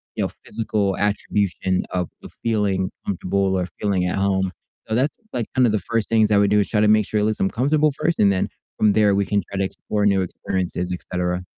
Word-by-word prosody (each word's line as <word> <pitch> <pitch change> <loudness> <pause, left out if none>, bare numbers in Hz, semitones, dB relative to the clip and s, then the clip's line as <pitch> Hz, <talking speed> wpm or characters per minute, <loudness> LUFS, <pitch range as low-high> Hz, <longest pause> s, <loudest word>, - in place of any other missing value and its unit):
you - - -2
know, - - -1 0.2
physical 105 -3 -1
attribution 100 -2 0
of 90 -2 -1
of - - -11
feeling 100 -5 0
comfortable 95 0 0
or 90 - 0 0.2
feeling 95 -3 +1
at 90 - -1
home, 95 -1 +1 0.4
so 110 - -1
that's, 130 +5 0 0.2
like, 120 -2 -1
kinda 125 -3 +4
the 105 - +1
first 115 +3 -2
things 110 -2 +4
I 105 - +5
would 100 0 +3
do, 105 - +5
is - - -2
try 105 - +2
to 105 - +4
make 105 -1 +4
sure 105 - 0
at - - +2
least 110 0 0
I'm 95 - +2
comfortable 150 +5 +2
first, 165 +4 -1
and 100 -1 +5
then 95 - -1 0.3
from 105 -1 +4
there 105 -2 +4
we 100 0 +1
can 100 -1 +1
try 100 - -5
to 95 - +2
explore 105 +2 -2
new 100 -1 +3
experiences, 90 0 -3
et 90 - -4
cetera. 90 0 -1
100 Hz, 235 wpm, -22 LUFS, 95-110 Hz, 0.4 s, I